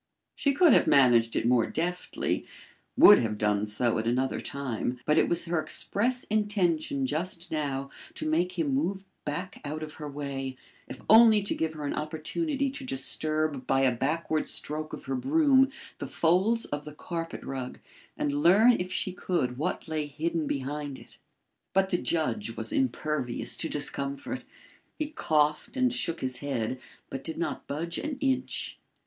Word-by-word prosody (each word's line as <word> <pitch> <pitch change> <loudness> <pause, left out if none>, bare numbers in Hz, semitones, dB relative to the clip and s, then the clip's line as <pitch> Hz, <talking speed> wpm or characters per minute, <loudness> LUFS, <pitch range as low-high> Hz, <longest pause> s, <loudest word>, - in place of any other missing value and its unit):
She 280 - +1
could 335 +2 +6
have - - +4
managed 120 -4 +5
it - - 0
more 120 -1 +3
deftly, 180 +2 -2 0.5
would 205 - +9
have 110 -3 -1
done 105 0 +1
so 115 +2 +1
at 110 - -2
another 130 +3 0
time, 125 -2 -3
but 150 +1 +4
it - - +2
was 170 0 0
her 170 -1 0
express 245 +10 +1
intention 180 -10 0
just 170 +4 -2
now 140 -3 -2 0.2
to - - -4
make 170 +4 +1
him 150 -5 0
move 190 +8 -1 0.2
back 180 +6 -4
out 155 +1 -4
of 155 -1 -7
her 150 - -4
way, 135 -2 -5 0.3
if - - -9
only 220 -2 +7
to 200 - 0
give 160 -1 -2
her 150 -2 -6
an 145 - -1
opportunity 275 - -2
to 275 0 -6
disturb 155 - -1
by 135 - +3
a 130 -2 +3
backward 155 +4 -1
stroke 155 +1 -2
of - - -8
her 135 - -3
broom 270 - +4 0.3
the - - -4
folds 190 +8 +2
of 145 0 -4
the 150 - -9
carpet 165 +1 -5
rug 130 -2 -5 0.4
and 145 - -1
learn 180 +11 +6
if 180 +1 -3
she 185 - -1
could 130 -10 -1
what 155 - -2
lay 155 -2 -2
hidden 160 +2 -2
behind 140 0 -3
it. - - -14 0.5
But 190 0 +2
the 175 - +2
judge 170 +6 -2
was - - -2
impervious 150 - -1
to 160 - -2
discomfort. 140 - -2 0.5
He 310 - -1
coughed 155 - 0
and 255 -1 +2
shook 180 -9 -1
his 130 -1 0
head, 130 -3 -2 0.3
but 135 0 -5
did 160 - -5
not 170 - -3
budge 170 +4 -3
an 295 -2 -4
inch. 265 -2 -1
155 Hz, 170 wpm, -28 LUFS, 140-190 Hz, 0.5 s, would